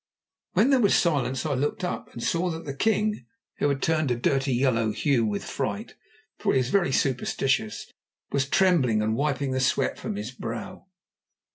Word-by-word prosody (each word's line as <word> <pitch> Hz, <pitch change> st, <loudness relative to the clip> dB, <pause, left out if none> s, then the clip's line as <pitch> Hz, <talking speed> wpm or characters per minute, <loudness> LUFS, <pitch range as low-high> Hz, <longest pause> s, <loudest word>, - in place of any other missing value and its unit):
When 255 Hz, +6 st, +4 dB
there 270 Hz, -, +5 dB
was 205 Hz, -4 st, +4 dB
silence 135 Hz, -6 st, +1 dB
I 150 Hz, -, 0 dB
looked 145 Hz, +7 st, -1 dB
up, 180 Hz, -, -4 dB
and 115 Hz, -, -7 dB
saw 175 Hz, +2 st, 0 dB
that 165 Hz, 0 st, -5 dB
the 140 Hz, -, -4 dB
king, 210 Hz, +6 st, 0 dB, 0.3 s
who 145 Hz, -, +2 dB
had 140 Hz, -1 st, -1 dB
turned 155 Hz, -3 st, +1 dB
a 120 Hz, -, +2 dB
dirty 135 Hz, +3 st, 0 dB
yellow 120 Hz, -3 st, +2 dB
hue 120 Hz, +2 st, +1 dB
with 105 Hz, -2 st, -1 dB
fright, -, -, -4 dB, 0.5 s
for -, -, +1 dB
he -, -, +3 dB
was 130 Hz, -1 st, +1 dB
very 185 Hz, -8 st, +2 dB
superstitious, 130 Hz, -3 st, 0 dB, 0.5 s
was 140 Hz, -1 st, 0 dB
trembling 140 Hz, -, +3 dB
and 110 Hz, +1 st, 0 dB
wiping 140 Hz, 0 st, -1 dB
the 130 Hz, -, 0 dB
sweat 130 Hz, 0 st, +1 dB
from -, -, -4 dB
his 105 Hz, +4 st, -5 dB
brow. 115 Hz, +8 st, -7 dB
135 Hz, 180 wpm, -26 LUFS, 120-160 Hz, 0.5 s, there